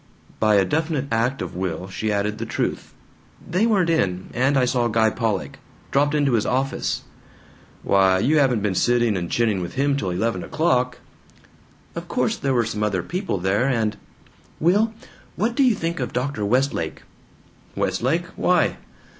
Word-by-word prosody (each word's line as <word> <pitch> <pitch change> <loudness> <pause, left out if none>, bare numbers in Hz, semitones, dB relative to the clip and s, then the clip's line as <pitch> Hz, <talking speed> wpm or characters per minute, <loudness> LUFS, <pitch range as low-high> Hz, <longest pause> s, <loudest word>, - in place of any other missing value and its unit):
By 110 -1 +4
a 100 -1 +4
definite 155 - -1
act 120 +4 0
of - - -7
will 90 -1 -3
she 105 +3 -3
added 105 +1 -1
the - - -3
truth: - - -3 0.6
"They 185 +7 +2
weren't 190 -7 +2
in. 95 - -1
And 135 +3 +2
I 130 - +3
saw 120 -1 +1
Guy 110 -1 +2
Pollock. 110 -5 -2 0.3
Dropped 145 +2 +2
into 145 -2 +2
his 110 -3 +2
office." 135 +1 -1 0.8
"Why, 95 -1 +4
you 145 +10 +3
haven't 125 -7 +2
been 105 -2 +1
sitting 120 +2 +2
and 85 -2 -3
chinning 110 -5 +1
with 85 - -6
him 140 +1 +2
till 100 -9 -2
eleven 95 +1 -1
o'clock?" 125 -6 0 1.0
"Of - - -6
course - - 0
there 135 -2 -1
were 120 -2 +2
some 110 -1 -4
other 100 -4 0
people 180 - -2
there 95 +7 +1
and 110 -4 0 0.6
Will! 205 +7 +3 0.4
What 225 +3 0
do 275 - +1
you 250 -5 +4
think 165 -3 -3
of 125 - -3
Dr. 125 -3 -2
Westlake?" 120 - 0 0.7
"Westlake? 160 +8 0
Why?" 180 -2 +2
120 Hz, 165 wpm, -22 LUFS, 105-145 Hz, 1.0 s, By